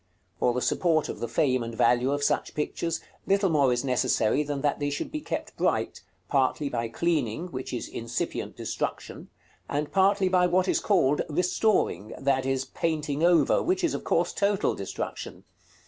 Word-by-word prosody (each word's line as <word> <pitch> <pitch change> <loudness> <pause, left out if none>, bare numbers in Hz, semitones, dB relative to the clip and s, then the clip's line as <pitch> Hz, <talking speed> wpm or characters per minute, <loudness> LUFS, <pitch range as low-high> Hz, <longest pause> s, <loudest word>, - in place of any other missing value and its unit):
For 120 - +2
the 125 - -1
support 160 -4 +1
of - - -5
the 120 - -3
fame 130 +1 +1
and 115 0 -5
value 125 +3 +3
of 145 0 -1
such - - 0
pictures, 160 +2 -2 0.3
little 195 -2 +3
more 140 -4 +3
is 125 +2 0
necessary 125 0 +2
than 145 -2 -3
that 145 0 0
they 145 0 0
should 145 - -4
be 305 0 -4
kept - - -5
bright, - - 0 0.3
partly 140 +1 +1
by 115 -2 -2
cleaning, 160 +3 -1
which 130 -2 -5
is 120 - -4
incipient 115 0 -4
destruction, - - -4 0.4
and 145 +1 -2
partly 195 0 +3
by 180 -1 +3
what 180 +1 +2
is - - +2
called 150 -9 +2
"restoring," 175 - +1
that 135 -1 +1
is, 135 0 0
painting 155 -3 -2
over, 170 -5 +4
which 370 +2 0
is 335 - +2
of - - -4
course 170 +1 +1
total 200 -1 +1
destruction. 95 - -6
145 Hz, 175 wpm, -27 LUFS, 130-180 Hz, 0.4 s, over